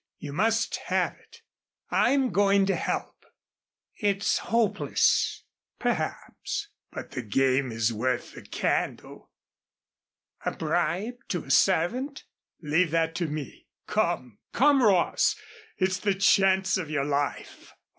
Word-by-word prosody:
You 145 -2 -7
must 225 +6 +1
have - - +1
it. - - -21 0.5
I'm 270 -3 +3
going 200 +1 +3
to 195 - +1
help." - - -3 0.8
"It's 200 -2 +1
hopeless." 230 -2 +1 0.3
"Perhaps. 410 0 -3 0.2
But - - -8
the 125 - -4
game 130 +3 +1
is 115 0 0
worth 120 +3 -2
the - - -10
candle." - - -3 1.1
"A - - -1
bribe 215 +8 -1
to 175 - -2
a 135 - -5
servant?" 195 - +2 0.4
"Leave 160 +3 +2
that 165 0 +1
to 170 -2 -1
me. 150 -3 -7 0.2
Come, 120 -5 -1
come, 280 +1 +4
Ross, 195 -7 +3 0.4
it's 185 0 0
the 200 -2 0
chance 195 -1 +3
of 170 -5 -4
your 145 -2 -1
life. 145 0 -3
185 Hz, 120 wpm, -27 LUFS, 145-205 Hz, 1.1 s, come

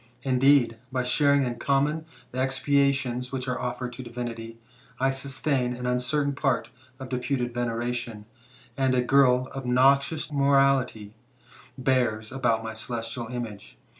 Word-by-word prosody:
Indeed, 130 -3 +3
by 130 -1 0
sharing 140 +2 +3
in 120 -2 -3
common 145 +5 +1 0.2
the 130 - -4
expiations 130 -1 +1
which 130 -1 -4
are 125 0 -2
offered 125 0 -4
to 125 - -7
divinity, 115 -2 -6 0.4
I 135 +1 +2
sustain 135 -1 -1
an 125 0 -6
uncertain 125 +4 0
part 135 -4 -1 0.3
of 130 -1 -7
deputed 125 -1 -2
vener 120 -1 -2
ation, 120 -3 -4 0.5
and 130 -1 +1
a 125 - +2
girl 130 -1 +4
obnoxious 135 +4 +2
to - - -11
mortality 135 -6 +2 0.6
bears 125 -5 0
about 115 -4 0
my 110 0 -5
celestial 115 +1 -5
image. 110 -4 -7
125 Hz, 135 wpm, -26 LUFS, 120-135 Hz, 0.6 s, girl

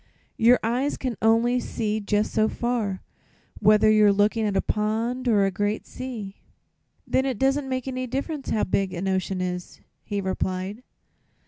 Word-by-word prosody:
"Your 240 +2 +6
eyes 250 +6 0
can 255 -3 -3
only 230 +3 +3
see 220 -3 -2
jus' 210 0 0
so 215 0 +2
far, 230 -6 -2 0.6
whether 215 +1 +5
you're 215 -1 +6
lookin' 210 +2 +2
at 200 -1 0
a - - +3
pond 225 +4 -1
or 205 -4 +4
a 195 - 0
great 205 +2 -2
sea." 225 -7 -7 0.7
"Then 260 - +1
it 265 -4 -2
doesn't 270 +2 +1
make 255 0 -3
any 255 -1 -3
difference 275 +3 -4
how 215 - +1
big 190 0 0
an 180 +3 -3
ocean 190 0 -1
is," 180 -1 -4 0.2
he 205 -1 -3
replied. 190 +2 -3
215 Hz, 160 wpm, -25 LUFS, 200-250 Hz, 0.7 s, Your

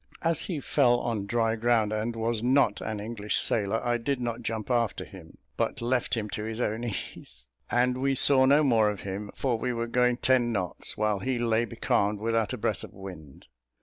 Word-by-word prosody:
As 165 -1 +2
he 170 -6 -3
fell 125 -4 +3
on 105 -4 -2
dry 115 0 +1
ground 115 -2 +2
and 110 +2 -2
was 115 0 -1
not 125 -3 +3
an 110 -1 -4
English 105 0 -3
sailor, 110 0 +1
I 120 0 +1
did 135 +3 -1
not 120 -1 -3
jump 110 +1 -3
after 120 -3 0
him, 90 -5 -13 0.2
but - - -1
left 125 +1 0
him 110 -2 -2
to 105 - -4
his 110 +1 -4
own 115 -1 -1
ease, 65 - -6 0.2
and 125 +1 +2
we 135 +1 +1
saw 130 0 +5
no 145 +3 +5
more 115 -6 +4
of 105 -2 -5
him, 100 +1 -5
for 125 -4 -1
we 125 - -1
were 115 0 -2
going 125 +1 +2
ten 125 -2 +2
knots, 95 -6 -3
while 105 -2 +1
he 125 +6 -1
lay 115 -1 +1
becalmed 105 -3 0
without 115 -1 0
a - - -3
breath - - -1
of - - -10
wind. 90 -8 -10
115 Hz, 205 wpm, -28 LUFS, 105-125 Hz, 0.2 s, saw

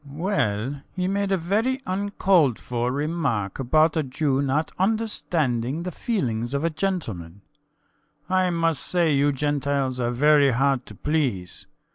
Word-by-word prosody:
SCHUTZMACHER. 145 +1 -11
Well, 135 - -1
he 180 -1 -1
made 200 0 -1
a 195 - +3
very 215 +10 0
uncalled 185 - +2
for 120 0 -2
remark 140 - -2
about 155 +6 +3
a 160 - +2
Jew 135 0 0
not 140 +3 0
understanding 170 - 0
the 180 - -4
feelings 125 - -2
of 140 - -1
a 165 - +1
gentleman. 110 - -3 0.9
I 185 0 +2
must 165 -4 0
say 170 -4 +2
you 145 +1 +3
Gentiles 140 -2 -1
are 120 -1 0
very 145 +3 +4
hard 135 +1 +1
to 105 - -11
please. 130 - -2
145 Hz, 145 wpm, -24 LUFS, 125-180 Hz, 0.9 s, very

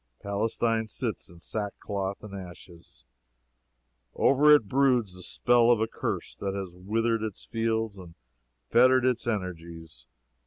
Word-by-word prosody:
Palestine 110 +2 -1
sits - - -4
in 85 0 -15
sackcloth 100 0 -4
and 105 -2 -9
ashes. 85 -7 -11 1.1
Over 140 +3 +4
it 115 -8 +1
broods 125 -6 +2
the 90 - -10
spell 120 +5 +3
of 120 -2 +5
a 110 - +2
curse - - -4
that 100 -1 -3
has 95 -3 -5
withered 115 +5 -1
its 110 -3 -5
fields 115 -3 -2
and 85 -2 -12 0.6
fettered 130 +2 +5
its 120 -2 0
energies. 85 -6 -5
105 Hz, 130 wpm, -27 LUFS, 90-115 Hz, 1.1 s, of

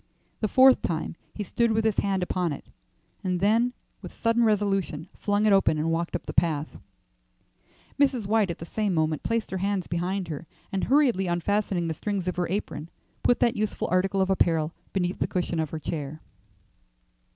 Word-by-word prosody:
The 215 - +1
fourth 260 +4 +6
time 165 -1 -2 0.2
he 210 - -3
stood 235 +4 +1
with 220 0 +1
his 220 -2 +2
hand 195 -2 0
upon 180 -2 -1
it, - - -9 0.6
and 180 -2 0
then 225 +5 +3 0.3
with - - -8
sudden 230 +1 +2
resolution 195 -7 +1
flung 205 +1 0
it 210 - +5
open 190 -5 +4
and 160 +2 0
walked 170 +1 -1
up 175 - -4
the - - -5
path. 155 -3 +1 1.2
Mrs. 265 -6 +2
White 210 -1 +2
at 170 - -3
the 165 - -7
same 205 +1 -1
moment 155 -2 +1
placed 230 -1 -1
her 190 - -2
hands 195 -1 0
behind 180 +2 -2
her, 155 +1 -6 0.2
and 195 - -1
hurriedly 250 -9 +3
unfastening 175 0 0
the 160 - -1
strings 195 +2 -3
of 180 - -2
her 175 -2 0
apron, 165 -5 -3 0.3
put 245 - +3
that 235 - +3
useful 215 0 -2
article 190 +1 +2
of 190 0 +2
apparel 165 -4 +2 0.2
beneath 180 -1 -1
the - - +1
cushion 175 -2 -2
of 160 -2 -1
her 160 - -4
chair. 155 -1 -5
190 Hz, 185 wpm, -26 LUFS, 170-210 Hz, 1.2 s, fourth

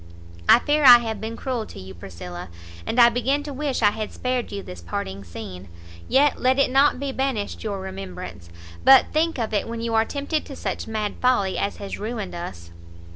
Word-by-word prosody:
I - - +10
fear 295 +4 +1
I 245 -3 +11
have 225 -3 -4
been 225 +1 -5
cruel 250 -5 -3
to - - -11
you, 95 0 -9
Priscilla, 90 0 -9 0.4
and 245 - 0
I 235 0 +9
begin 255 +5 0
to 290 -1 -6
wish 275 -3 -2
I 205 - +6
had 215 0 -5
spared 250 -1 -2
you 200 -1 -5
this 90 -1 -9
parting 95 +3 -5
scene; 95 0 -9 0.4
yet 285 +1 +3
let 260 +1 +3
it 275 - +3
not 275 0 +4
be 280 0 -2
banished 265 -6 -2
your 205 -3 -3
remembrance, 185 - -8 0.3
but 265 -1 +6
think 325 +1 +1
of 225 -3 -3
it 205 - 0
when 230 0 -5
you 230 0 -2
are 220 0 +4
tempted 285 +5 -2
to 275 - -9
such - - -4
mad 215 -2 -3
folly 245 -7 +2
as 200 - -2
has 200 -1 -6
ruined 215 -2 -4
us." 85 - -7
225 Hz, 205 wpm, -23 LUFS, 185-260 Hz, 0.4 s, I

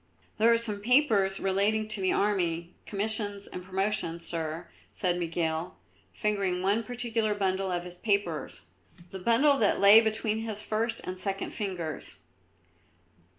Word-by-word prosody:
"There 230 +2 +5
are 230 - +5
some 220 -3 0
papers 215 -6 +3
relating 205 +3 +1
to 215 -2 -4
the 185 - +2
army, 175 -4 0
commissions 205 -1 -3
and 180 - -8
promotions, 190 -3 -2
Sir," 165 0 -4 0.2
said 180 -3 -1
Miguel, 165 0 -2 0.3
fingering 195 -4 -1
one 200 +4 +2
particular 230 -2 -1
bundle 190 -1 0
of 175 -1 -1
his 180 0 -10
papers, 175 - -1 0.5
the 190 - -6
bundle 270 +8 +3
that 210 - +2
lay 205 +3 +9
between 220 0 -1
his 220 -2 -3
first 225 +2 -2
and 185 0 -6
second 195 +1 -2
fingers. 180 -7 -5
200 Hz, 140 wpm, -29 LUFS, 180-220 Hz, 0.5 s, lay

